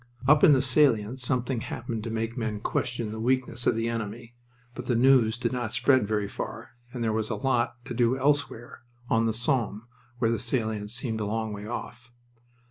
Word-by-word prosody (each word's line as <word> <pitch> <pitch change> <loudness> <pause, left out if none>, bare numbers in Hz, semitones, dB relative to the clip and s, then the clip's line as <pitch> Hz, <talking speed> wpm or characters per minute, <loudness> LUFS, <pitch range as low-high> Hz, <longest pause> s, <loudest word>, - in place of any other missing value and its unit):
Up 150 0 +5
in 150 - +8
the 130 -1 +3
salient 130 -4 +3
something 125 -1 0
happened 115 -1 -5
to - - -3
make 115 +1 -3
men 110 -4 -3
question 120 0 -2
the 110 - -6
weakness 125 0 0
of - - +3
the 115 0 -1
enemy, 115 +1 -5 0.4
but 125 0 -8
the 120 - +1
news 120 -2 +4
did 125 - -1
not 120 -4 -3
spread 130 -7 +3
very 105 -1 -1
far - - -7 0.2
and 125 -2 -4
there 110 -1 0
was 110 0 -1
a - - -1
lot 125 -3 0
to - - -5
do 120 +1 +2
elsewhere, 140 -3 -1 0.3
on 115 0 +3
the - - +2
Somme, 115 -3 0 0.3
where 115 -1 +1
the 115 - -1
salient 110 -3 -1
seemed 115 -1 -2
a - - -1
long 110 0 -2
way 105 +1 -7
off. 120 +1 -7
115 Hz, 200 wpm, -27 LUFS, 110-125 Hz, 0.4 s, in